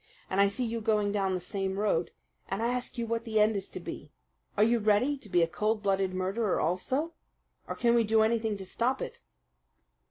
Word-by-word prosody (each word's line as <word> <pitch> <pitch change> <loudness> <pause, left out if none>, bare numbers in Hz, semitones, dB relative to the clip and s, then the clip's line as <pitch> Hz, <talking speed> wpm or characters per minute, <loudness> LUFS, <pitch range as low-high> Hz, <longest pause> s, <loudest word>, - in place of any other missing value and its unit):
And 190 +1 +3
I 200 - +6
see 220 +6 -2
you 230 0 -3
going 210 -2 +1
down 195 -2 0
the - - -2
same 190 +1 -3
road, 200 -5 +1 0.4
and 195 +4 -2
I 235 - +2
ask 250 0 -3
you 235 - -1
what 230 0 -2
the 220 -2 0
end 215 +1 +4
is 195 -1 -4
to - - -6
be. - - -8 0.5
Are 210 - +5
you 230 +2 +3
ready 220 +7 +3
to 215 - -13
be 175 -2 +4
a - - +2
cold 215 +5 -1
blooded 195 -1 +1
murderer 190 +3 0
also, 260 - -1 0.5
or - - -4
can 235 -1 +2
we 235 -1 +4
do 220 0 +3
anything 220 -1 +1
to 190 - -8
stop 240 +8 0
it?" - - -8
210 Hz, 220 wpm, -29 LUFS, 195-230 Hz, 0.5 s, I